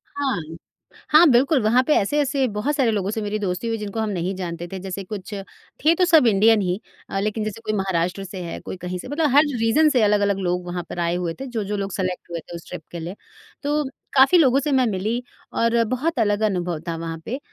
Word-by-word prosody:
हाँ। 275 -10 -1 0.7
हाँ, 310 +3 +7
बिल्कुल 260 +2 +4
वहाँ 225 +4 +4
पे 305 - +4
ऐसे-ऐसे 275 +4 +1
बहुत 255 +9 -1
सारे 260 -5 +2
लोगों 200 -2 -1
से 220 - -3
मेरी 210 +1 -2
दोस्ती 190 +2 -2
हुई 225 - 0
है - - -6
जिनको 210 +1 -4
हम 220 -1 0
नहीं 185 -1 -2
जानते 175 -2 -5
थे। 190 - -5
जैसे 190 +1 -5
कुछ 200 +1 -7 0.5
थे 325 - +7
तो 365 - +3
सब 320 -7 +5
इंडियन 215 +1 +5
ही 180 +1 -1 0.3
अ, 195 - -2
लेकिन 215 +2 -1
जैसे 215 +1 -5
कोई 215 -1 -2
महाराष्ट्र 190 0 -1
से 190 0 -7
है, 170 - -6
कोई - - -7
कहीं 180 0 -5
से - - -8
मतलब 295 +3 +1
हर 290 - +8 0.2
रीजन 280 +8 +4
से 255 -5 +2
अलग-अलग 205 -1 +3
लोग 180 -1 -1
वहाँ 175 0 -3
पर 175 - -5
आए 170 0 0
हुए 175 -2 -2
थे 270 - -5
जो-जो 210 -4 -3
लोग 195 0 -3
सेलेक्ट 185 -2 -3
हुए 170 - -3
थे 170 - -10
उस 170 - -10
ट्रिप - - -7
के 170 - -6
लिए। 170 +4 -6 0.5
तो 295 +1 +1 0.3
काफ़ी 275 +7 +6
लोगों 275 -4 +5
से 290 +1 -2
मैं 260 -2 +4
मिली 215 +5 -1 0.3
और 230 0 +2
बहुत 260 +5 -1
अलग 205 -1 +2
अनुभव 180 -5 0
था 165 - -2
वहाँ 165 0 -5
पे 260 +4 -3
210 Hz, 235 wpm, -22 LUFS, 185-255 Hz, 0.7 s, हर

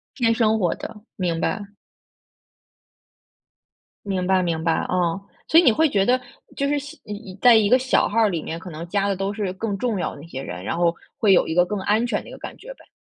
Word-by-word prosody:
偏 230 -3 +2
生 220 -1 +2
活 175 -3 +1
的， 210 - -9 0.2
明 170 -3 -1
白。 205 -2 -2 2.4
明 190 -3 -2
白 190 0 +3
明 165 -2 -1
白， 165 -1 +2
哦。 180 0 0 0.3
所 320 - +4
以 - - +4
你 255 - +6
会 320 +8 +3
觉 195 -4 +2
得 250 +3 +3 0.4
就 280 - 0
是 290 - +1
小 290 +3 -7 0.4
在 245 -2 +8
一 215 -2 +4
个 255 - +5
小 260 0 +2
号 225 0 +3
里 170 -5 -2
面， 165 +2 -5
可 180 - -9
能 165 +1 -7
加 200 +2 0
的 200 - 0
都 195 +2 -2
是 200 -3 -3
更 200 0 -3
重 230 -2 -1
要 - - -2
的 140 - -11
一 165 - -12
些 135 -5 -6
人， 90 -7 -7
然 140 - -3
后 170 -1 +2 0.2
会 210 -3 +3
有 - - +4
一 160 - -2
个 180 0 +5
更 210 +1 -3
安 215 +4 +2
全 245 - -1
的 - - -15
一 - - -11
个 - - -9
感 - - -9
觉 - - -10
呗。 - - -21
200 Hz, 255 characters per minute, -23 LUFS, 175-230 Hz, 2.4 s, 在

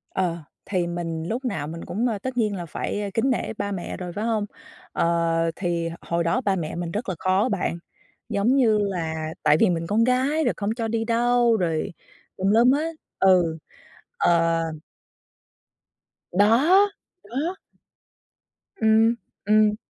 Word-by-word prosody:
Ờ, 175 -3 0 0.3
thì 180 -3 -1
mình 165 -2 -3
lúc 245 +6 -3
nào 200 - -2
mình 165 +2 -7
cũng, 230 +6 -1
ờ, 225 -3 -1
tất 255 +4 -5
nhiên 215 -3 +1
là 175 -2 -5
phải, 170 +5 -3
a, 205 - -3
kính 230 +6 +1
nể 255 - -1
ba 200 - -2
mẹ 185 -3 -5
rồi, 180 -1 -6
phải 210 +4 -3
hông? 220 -3 0 0.5
Ờ, 165 -1 +1
thì 170 -2 -1
h - - -7
hồi 170 0 -1
đó 170 +10 +1
ba 200 -5 +1
mẹ 165 -4 -4
mình 170 -1 -4
rất 210 +3 -3
là 185 - -2
khó 190 +6 +2
bạn, 185 -3 -1 0.5
giống 215 +6 +2
như 230 -6 +4
là 160 -5 -2
tại 150 0 +5
vì 220 - +5
mình 165 -1 -1
con 220 +2 +2
gái 260 +6 +2
rồi 245 - +1
không 200 0 -2
cho 230 -2 -2
đi 225 0 -1
đâu 240 0 +3
rồi 165 -3 -1 0.4
tùm 190 +1 +1
lum 235 +4 +5
hết. 315 +4 0 0.2
Ừ, 180 -4 +4 0.6
ờ 165 - +3 1.7
Đó! 265 - +5 0.4
Đó. 305 +9 -3 1.3
Ừm, 220 +1 +5 0.3
ừm. 215 0 +4
205 Hz, 165 wpm, -24 LUFS, 170-235 Hz, 1.7 s, tại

